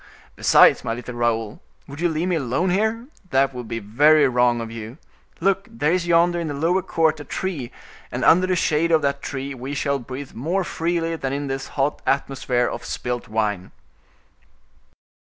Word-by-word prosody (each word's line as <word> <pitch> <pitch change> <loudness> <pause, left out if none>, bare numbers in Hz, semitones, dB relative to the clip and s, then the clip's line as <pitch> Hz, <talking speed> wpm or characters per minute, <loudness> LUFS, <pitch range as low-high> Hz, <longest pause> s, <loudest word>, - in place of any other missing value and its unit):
Besides, - - +5
my 115 - -2
little 125 +1 -7
Raoul, 115 -2 -1 0.3
would 140 +3 -9
you 175 - +2
leave 160 +2 -1
me 180 - +1
alone 145 +5 0
here? 220 +5 0 0.2
That 135 -1 +2
would 125 -2 -7
be 115 - -4
very 145 +8 +4
wrong 125 -1 +2
of 115 -1 -5
you. 115 +3 -8 0.4
Look, 195 +2 +1
there 145 +7 0
is 180 -1 0
yonder 175 +1 +3
in 170 - -3
the 145 - -4
lower 170 +6 +1
court 160 -4 +1
a - - -6
tree, 145 -4 -4 0.4
and - - -2
under 185 +3 +5
the 185 - +1
shade 165 -1 +1
of 160 -2 +3
that 140 0 0
tree 140 0 -5
we 135 +2 -6
shall 140 -1 0
breathe 130 +3 -8
more 170 +11 -1
freely 165 -1 -1
than 135 -3 -3
in 145 +1 -2
this 135 -1 -4
hot 140 +2 0
atmosphere 135 -3 0
of - - -5
spilt 120 -1 -4
wine." 105 -4 -2
140 Hz, 185 wpm, -22 LUFS, 125-170 Hz, 0.4 s, Besides